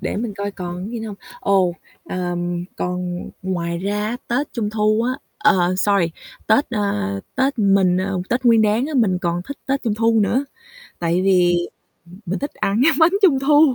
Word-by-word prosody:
để - - -3
mình 215 -1 -3
coi 200 0 -3
còn 180 +1 -6
gì 235 -1 -4
nữa 225 - -5
hông? 205 - -7 0.2
Ồ, 190 -3 +2 0.3
ờm, 175 -1 -3
còn 180 0 -3
ngoài 170 -2 -2
ra 205 +3 -2
á, 235 - -2
Tết 265 +5 -1
Trung 220 -4 -2
Thu 215 +1 +2
á, 250 +2 0 0.3
ờ, 185 -3 +3
sorry, 195 -3 +2 0.4
Tết, 250 +7 +3
a, 150 - -1 0.2
Tết 265 0 0
mình 195 -3 +3
ờ, 190 0 -1
Tết 250 +2 -1
Nguyên 230 -2 +5
Đán 215 +5 +2
á, 310 - -5
mình 210 -8 +2
còn 175 -1 -2
thích 280 +9 -8
Tết 275 0 0
Trung 225 -4 0
Thu 225 0 +2
nữa, 245 +7 +1 0.5
tại 170 +1 0
vì 175 -2 +3 0.6
mình 185 +3 -2
thích 285 - -5
ăn 200 +3 0
cái 320 - +5
bánh 330 +2 +5
Trung 325 -9 +5
Thu. 290 0 +5
200 Hz, 190 wpm, -20 LUFS, 180-235 Hz, 0.6 s, Nguyên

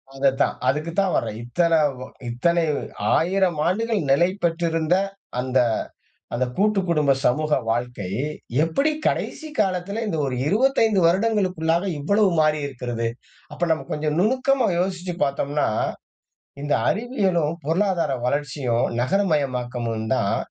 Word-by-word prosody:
அத 135 0 +3
தான், - - +2
அதுக்கு 155 +4 0
தான் 195 -2 +2
வர்றேன். 105 - -1
இத்தனை, 165 +7 +2 0.5
இத்தனை 170 +8 +1 0.5
1000 180 0 +1
ஆண்டுகள் 220 +3 0
நிலை 170 +6 +5 0.2
பெற்றிருந்த 165 0 +1 0.4
அந்த, 130 +1 +1 0.8
அந்த 125 +2 +1
கூட்டு 210 0 +2
குடும்ப 150 -4 +3
சமூக 155 +4 +2 0.2
வாழ்க்கை, 120 -5 -2 0.5
எப்படி 275 - +1 0.2
கடைசி 315 - -2
காலத்தில 195 +2 -1
இந்த 165 - -2
ஒரு 130 - -2
25 225 - +3
வருடங்களுக்கு 190 -1 +1
உள்ளாக 170 +4 +2
இவ்வளவு 200 +7 +2
மாறி 155 0 +3
இருக்கிறது. 120 -4 -3 0.4
அப்ப - - -9
நம்ம 155 - -3
கொஞ்சம் 150 0 -1
நுணுக்கமா 255 +3 +2
யோசிச்சி 180 -1 -2
பாத்தோம்ன்னா, 145 +1 -1 0.9
இந்த 145 0 +1 0.2
அறிவியலும், 195 - 0
பொருளாதார 170 -2 +1
வளர்ச்சியும் 135 -3 0
நகரமயமாக்கமும் 125 - -1
தான் 100 -6 +1
165 Hz, 115 wpm, -23 LUFS, 135-195 Hz, 0.9 s, நிலை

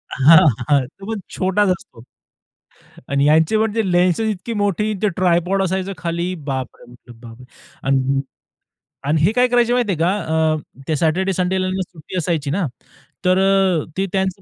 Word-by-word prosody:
हां, 150 +5 +7 0.3
हां, 140 -3 +3
तो 195 +7 -14
पण 215 - -3 0.2
छोटाच 190 +1 +1
असतो 145 -10 -5 1.1
आणि 140 0 +1
ह्यांचे 160 +7 +3
म्हणजे 220 0 0
लेन्सेस 180 +5 +2
इतकी 205 +5 -7
मोठी 210 +2 0
न - - -6
ते 210 - +2
ट्रायपॉड 185 +1 +1
असायचं 190 +1 -2
खाली, 170 +2 -3
बापरे 135 -6 -6
म्हटलं 120 -1 -16
"बापरे!" 120 +1 -12 0.4
अं, 135 0 +1 0.8
आणि 150 +2 +1
हे 180 +7 +4
काय 250 +1 +3
करायचं 240 0 +2
माहिती 240 -5 +1
आहे 165 - -3
का? 170 +2 +2 0.4
अ, 145 -3 -8
ते 155 - 0
सॅटरडे, 180 +5 +1
संडेला 185 +1 0
ना 190 0 -2
सुट्टी 180 0 -8
असायची 160 -4 -1
ना? 180 0 0 0.6
तर 185 0 +4
अ, 190 -4 +2
ते 195 - +1
त्यांचं 190 0 -1
180 Hz, 165 wpm, -19 LUFS, 150-195 Hz, 1.1 s, हां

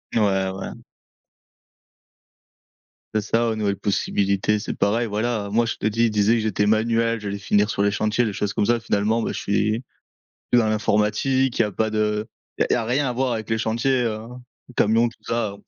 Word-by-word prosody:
Ouais, 95 -4 +2
ouais. 95 0 -6 2.4
C'est 110 - +2
ça, 115 +3 +1
aux 110 - -1
nouvelles 105 -2 0
possibilités, 100 +1 0
c'est - - -4
pareil, 115 +3 +1
voilà. 105 -1 -2
Moi, 115 +3 +2
je 115 - -3
te 110 - -1
dis, 115 +2 +2
il 115 - +1
disait 105 +2 +3
que 115 - 0
j'étais 105 -1 0
manuel, 115 +1 +2
j'allais 100 -1 -4
finir 105 +1 +2
sur - - -1
les 100 - +3
chantiers, 110 +3 0
des 105 -3 -1
choses 100 0 -2
comme 105 - 0
ça. 120 0 +3
Finalement, 110 0 0
beh, - - -2
je - - -4
suis 110 +4 0 0.7
que 120 - +6
dans 110 - +2
l'informatique, 110 +5 +1
il - - +5
y - - +2
a 105 - -3
pas 110 +3 0
de 105 0 0 0.3
il - - +2
y - - +4
a 115 - 0
rien 130 +4 +1
à - - -1
voir 130 0 0
avec 110 -1 -4
les 110 - +1
chantiers, 120 +4 +1
heu, 110 -2 -1 0.6
camions 115 +3 +3
tout 115 - -17
ça, 110 -4 -2
110 Hz, 205 wpm, -23 LUFS, 105-115 Hz, 2.4 s, que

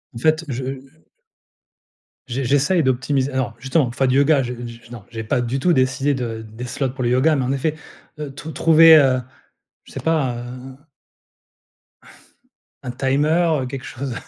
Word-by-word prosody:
En - - -6
fait, 155 +4 +1
je, 130 -1 -4
heu 135 +4 -8 1.2
J'e 130 +2 -3
j'essaye 145 +7 +2
d'optimis 130 +1 0
non, 130 -2 -1
justement, 135 +3 +1
pour 120 - -7
faire 135 - +1
du 130 - +1
yoga, 140 0 +4
j'ai 125 0 -5
je 115 0 -12
non, 120 -4 -9
j'ai 110 -2 -6
pas 125 +2 0
du 120 +3 -2
tout 175 +5 +2
décidé 130 +2 +1
de 115 -4 -4
des 110 +2 -10
slots 130 +2 -2
pour 130 0 -5
le 120 - +1
yoga 140 +5 +3
mais 135 - 0
en 125 - -1
effet, 145 +3 -1 0.4
heu, 150 -2 -6
trou 150 +3 -8
trouver, 160 +2 +7
heu, 135 -4 +4 0.6
je - - -17
sais - - -6
pas, 145 -7 0
heu, - - -5
un 125 +2 -9 2.1
un 125 - -4
timer, 150 +5 +1
heu, - - -3
quelque 130 +1 -7
chose 130 0 -5
130 Hz, 185 wpm, -20 LUFS, 125-145 Hz, 2.1 s, trouver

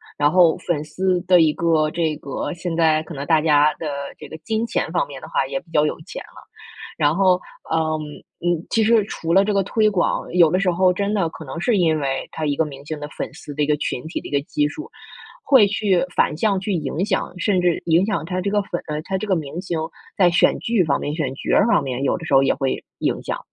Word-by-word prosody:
然 145 0 +2
后 175 -2 +5
粉 160 -4 -2
丝 180 +4 0
的 180 -1 +5
一 155 -1 +4
个 160 -2 +1
这 160 -1 -1
个 140 +5 -5
现 175 -1 -4
在 160 -2 +3
可 160 0 -9
能 140 +1 -5
大 160 0 +3
家 150 -1 +4
的 160 - -4 0.3
这 150 - -9
个 160 - -9
金 220 +7 -2
钱 160 - -2
方 175 - 0
面 140 -2 -9
的 - - -8
话， 135 - 0
也 135 0 -3
比 165 - -22
较 150 0 +3
有 - - -4
钱 - - -8
了。 - - -16 0.5
然 145 +2 +3
后， 185 -1 +3 0.3
呃， 160 - +2 0.7
嗯， 175 -2 +1
其 225 - +2
实 225 0 +4
除 165 -4 -3
了 195 +2 +6
这 210 - 0
个 200 -1 +2
推 215 +2 +2
广， 190 -4 -1
有 170 -3 +6
的 185 - +2
时 195 -1 +1
候 180 +1 +3
真 200 +3 -1
的 190 -5 +1
可 160 - -10
能 140 +2 -7
是 210 +5 +1
因 160 -4 +2
为 135 -2 -2
他 160 - -4
一 145 -1 0
个 160 - +2
明 140 -2 -9
星 155 0 -5
的 145 - -6
粉 - - -4
丝 145 - -10
的 150 - +1
一 - - +2
个 150 0 +2
群 125 - -3
体 160 - -4
的 - - -9
一 - - -11
个 140 - +2
基 145 0 0
数， 310 - -8 0.5
会 260 -7 +6
去 200 -3 +1
反 150 - +2
向 200 +2 +1
去 195 +2 -3
影 160 +1 -2
响 195 - -1
甚 190 0 +1
至 175 -2 +1
影 170 +3 +4
响 210 -7 -1
他 180 +3 -3
这 195 +2 -2
个 205 0 +2
粉 175 -3 -4
呃， 150 0 -3
他 190 +4 -3
这 215 - -4
个 195 -3 +1
明 155 0 -5
星 175 -3 -3 0.4
在 180 -3 +4
选 170 - +3
剧 225 -5 +1
方 150 -4 0
面、 145 - -3
选 145 -5 -2
角 135 - -1
儿 - - +5
方 230 - +3
面， 130 -1 -3
有 140 - +1
的 165 - -7
时 160 - -3
候 135 - +6
也 - - +3
会 135 -2 -2 0.2
影 - - -1
响。 - - -3
165 Hz, 280 characters per minute, -21 LUFS, 150-190 Hz, 0.7 s, 了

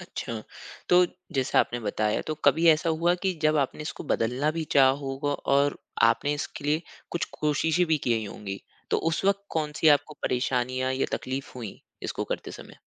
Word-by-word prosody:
अच्छा, 110 -2 -6 0.5
तो 180 0 +6 0.3
जैसा 135 -4 +1
आपने 120 - -1
बताया, 105 0 0
तो 155 - -1
कभी 165 +1 +4
ऐसा 155 +1 +2
हुआ 170 +2 +2
कि 190 -1 +2
जब 155 0 +3
आपने 140 +1 -1
इसको 150 - -6
बदलना 125 +6 0
भी 160 +1 -3
चाहा 135 -2 +7
होगा 135 +1 -2 0.2
और 140 0 +2 0.2
आपने 115 +6 +3
इसके 145 0 -6
लिए 150 +3 +1 0.3
कुछ 170 - -1 0.2
कोशिशें 155 +3 +2
भी 160 -2 +2
किए 120 -3 +1
ही 110 - -3
होंगी, 100 -1 -6 0.3
तो - - +3
उस 165 - -2
वक़्त 200 0 +2
कौन-सी 150 +1 +1
आपको 150 - -14
परेशानियाँ 130 +1 0
या 130 - 0
तकलीफ 130 +1 -5
हुईं, 115 -5 -7 0.2
इसको - - -3
करते - - -4
समय? - - -12
145 Hz, 180 wpm, -27 LUFS, 125-155 Hz, 0.5 s, चाहा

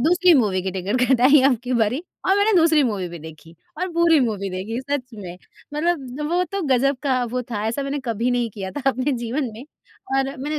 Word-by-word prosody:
दूसरी 350 +5 +4
मूवी 210 -9 +2
की 190 - -2
टिकट 195 +6 -2
कटाई 265 +3 +5
अबकी 250 -1 -1
बारी 220 +5 +1 0.3
और 385 +1 +4
मैंने 410 +2 +3
दूसरी 320 -3 +4
मूवी 205 -8 -2
भी 170 0 -9
देखी 160 +1 -12 0.3
और 370 - -1
पूरी 335 -2 +4
मूवी 210 -5 -1
देखी 200 +7 -4
सच 265 -3 -4
में। 180 -4 -8 0.4
मतलब 300 -4 -2
वो 355 +1 +2
तो 395 +2 -4
गज़ब 270 +1 +2
का 260 -3 +1
वो 250 +2 -3
था, 225 -4 -5
ऐसा 235 +6 -2
मैंने 275 +1 -3
कभी 235 +1 -1
नहीं 245 -1 0
किया 195 -2 -6
था 290 - -6
अपने 260 +3 -1
जीवन 240 +2 -2
में 230 - -9 0.5
और 270 - +2
मैंने 300 +3 -3
255 Hz, 210 wpm, -22 LUFS, 220-290 Hz, 0.5 s, कटाई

